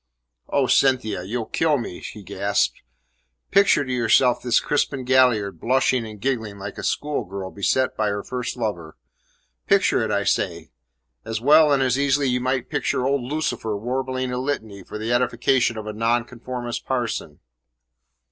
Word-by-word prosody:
"Oh, 140 - +2
Cynthia! 125 -8 +2
You'll 110 +5 -3
kill 155 +3 +1
me!" 115 -8 -6
he 105 - -9
gasped. 100 +2 -1 0.7
"Picture 195 -7 +4
to 130 - -3
yourself 125 +1 +3
this 120 -2 +3
Crispin 140 -2 -1
Galliard 125 -6 +3
blushing 130 -1 +1
and 105 -1 -10
giggling 110 -5 -2
like 95 - -7
a - - -6
schoolgirl 100 -10 -3
beset 130 +6 0
by 110 - 0
her 100 0 -3
first 125 -1 -4
lover. 90 -9 -4 0.7
Picture 195 -9 +3
it, 110 - -1
I 100 -1 +1
say! 85 -5 -1 0.5
As 110 0 -3
well 150 +4 +6
and 135 -1 +3
as 130 +1 +1
easily 135 -2 +2
might 130 +1 +1
you 125 - -3
picture 125 - -1
old 140 0 +1
Lucifer 120 -5 -2
warbling 130 +3 -2
a 125 - -2
litany 110 -7 -3
for 105 - -8
the 110 +3 -2
edification 120 0 +1
of 110 - -6
a 110 - -5
Nonconformist 120 +2 -2
parson." 120 - -3
125 Hz, 155 wpm, -23 LUFS, 105-130 Hz, 0.7 s, well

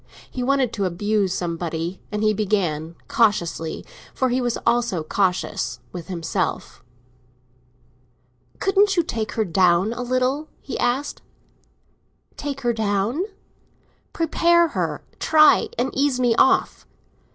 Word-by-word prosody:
He 255 - -4
wanted 260 -2 +1
to 200 -3 -1
abuse 200 +2 0
somebody, 170 0 -3
and 210 0 -2
he 215 0 +3
began, 180 -7 -1
cautiously—for 205 +2 -1
he 250 +1 0
was 240 -1 -1
always 235 0 +2 0.2
cautious—with 180 -2 -2
himself. 170 -4 -3 1.7
"Couldn't 390 0 +2
you 345 - +4
take 225 -8 -4
her 220 -2 0
down 185 +3 +3
a 245 - -5
little?" 255 +4 0
he 275 - -6
asked. 265 +4 -1 1.1
"Take 280 -1 -5
her 240 -2 +1
down?" 220 - 0 0.9
"Prepare 340 +1 +3
her—try 315 +9 +2
and 260 - 0
ease 275 -2 +1
me 245 -2 +3
off." 265 - +2
230 Hz, 110 wpm, -22 LUFS, 185-270 Hz, 1.7 s, you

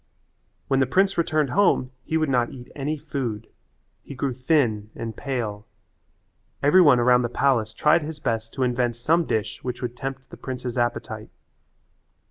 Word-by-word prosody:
When 135 - +2
the 130 - +3
prince 195 +7 +2
returned 155 -5 +1
home 175 -9 +3
he 160 - -1
would 155 -1 +1
not 125 -3 +2
eat 125 -2 -11
any 150 +2 -2
food. 120 -7 -4 0.6
He 140 - -10
grew 130 0 -1
thin 120 -5 +1
and 115 -1 -5
pale. 115 -7 -4 1.0
Every 150 +6 +6
one 145 -8 +6
around 125 +1 +5
the 120 - -1
palace 120 -4 +1
tried 150 +8 +3
his 155 0 -6
best 115 -3 -2
to 135 - 0
invent 120 -1 0
some 160 +8 +2
dish 110 -4 -2
which 125 -1 -4
would 120 0 -3
tempt 135 +1 -6
the - - -10
prince's 125 -2 -5
appetite. 120 -1 -2
130 Hz, 165 wpm, -24 LUFS, 120-145 Hz, 1.0 s, Every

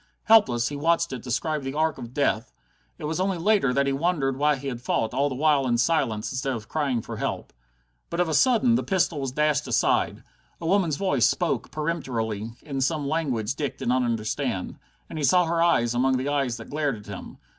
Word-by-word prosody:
Helpless, 165 - +4
he 145 - -5
watched 165 +1 +1
it 125 - -5
describe 150 +5 -2
that 135 +1 -4
arc 160 +1 0
of 120 -1 -8
death. 130 -5 0 0.5
It - - -11
was 155 +3 -2
only 190 -1 0
later 195 -5 +2
that 140 +2 +2
he 140 - 0
wondered 140 -3 0
why 150 +2 +2
he 135 +1 -7
had 120 -3 -4
fought 115 -2 -1
all 140 +3 +1
the 130 - -4
while 145 -1 +2
in 120 -1 +2
silence, 120 -6 0
instead 130 0 -2
of 110 -2 -8
crying 135 -7 -1
for - - -7
help. - - -4 0.6
But 170 - -4
of 180 - +2
a 160 - -1
sudden 245 - +4
the 230 - +2
pistol 180 -5 0
was 135 -2 -2
dashed 150 0 +1
aside. 120 - +1 0.4
A 165 - -7
woman's 175 -3 +2
voice 145 - +2
spoke - - -1
peremptorily, 115 -9 -3
in 135 -3 -4
some 145 +1 0
language 135 -8 -1
Dick 140 -1 -4
did - - -3
not 130 +1 +3
understand. 115 -3 -2 0.3
And 160 - -6
he - - -2
saw 180 +4 +4
her 165 0 0
eyes 120 -9 +3
among 130 +2 +2
the 130 +3 -2
eyes 135 -5 0
that 115 - -11
glared 145 -3 0
at 105 - -13
him. 100 -2 -9
140 Hz, 215 wpm, -25 LUFS, 125-160 Hz, 0.6 s, Helpless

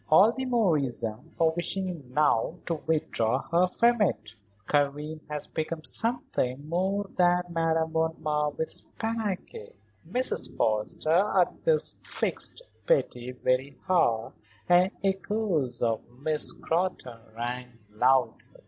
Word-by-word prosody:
"All 195 +8 +7
the 260 +2 -4
more 225 -10 +3
reason 115 -5 -3
for 165 -1 +2
wishing 175 -5 -3
now 150 +1 +2
to 165 -3 -2
withdraw 135 -6 +1
her 175 +2 +4
from 235 +4 +3
it. 105 - 0 0.3
Karen 150 +2 0
has 150 -1 -4
become 160 0 -4
something 150 - -1
more 190 +4 0
than 180 0 +4
Madame 165 -1 +1
von 160 0 0
Marwitz's 150 +1 -1
panache." 215 - -4 0.3
Mrs. 250 +7 -2
Forrester 155 - +2
at 180 - +1
this 485 -2 +3
fixed - - 0 0.2
Betty 125 - +1
very 130 +2 -1
hard 120 -12 +2 0.3
and 180 +1 +5
echoes 190 - -1
of 115 -1 +1 0.2
Miss 155 +1 0
Scrotton 165 -9 -2 0.2
rang 125 +1 -4 0.2
loudly. 125 +4 +3
160 Hz, 120 wpm, -28 LUFS, 130-185 Hz, 0.3 s, All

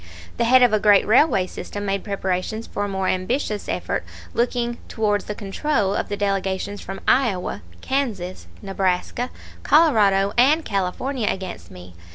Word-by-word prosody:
The 235 - +1
head 255 +2 +6
of 240 -3 +4
a 215 - +4
great 205 -1 +5
railway 220 -4 +4
system 205 +2 -7
made 195 0 -1
preparations 200 +2 -2
for 205 - -4
a - - -4
more 190 -1 -2
ambitious 210 +3 -1
effort - - -2 0.3
looking 240 0 -1
towards 210 -2 0
the 210 - -5
control 205 0 -1
of - - -2
the 205 - -3
delegations 195 0 -2
from 195 0 -7
Iowa, 195 - +1 0.2
Kansas, 215 -10 -3 0.2
Nebraska, 195 +5 -1 0.3
Colorado, 205 -11 +4
and 300 +6 +4
California 210 +6 -2
against 180 - -5
me. 90 0 -12
205 Hz, 150 wpm, -22 LUFS, 190-240 Hz, 0.3 s, head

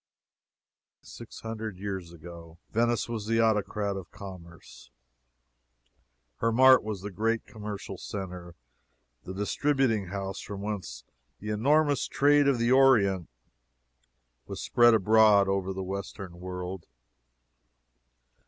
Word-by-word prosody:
Six 115 - -11
hundred 110 -3 -6
years 95 -3 -5
ago, 85 0 -12
Venice 120 0 +1
was 110 -3 -5
the 115 0 +1
Autocrat 105 -2 0
of 95 -3 -8
Commerce; 90 -4 -12 1.5
her 115 - 0
mart 130 +2 +7
was 105 -3 -5
the 100 +1 -6
great 115 +4 -1
commercial 105 -3 -7
centre, 90 -3 -7 0.7
the 95 - -6
distributing 115 0 0
house 95 +1 -5
from 100 -1 -7
whence 105 -2 -5 0.4
the 105 +1 -5
enormous 145 +6 +2
trade 145 0 +3
of 140 -3 +3
the 120 +1 +1
Orient 110 - +4 1.2
was - - -6
spread 120 -1 +4
abroad 105 -1 +5
over 95 -1 -1
the 95 0 -4
Western 95 -2 -7
world. 90 0 -6
105 Hz, 115 wpm, -28 LUFS, 95-115 Hz, 1.5 s, mart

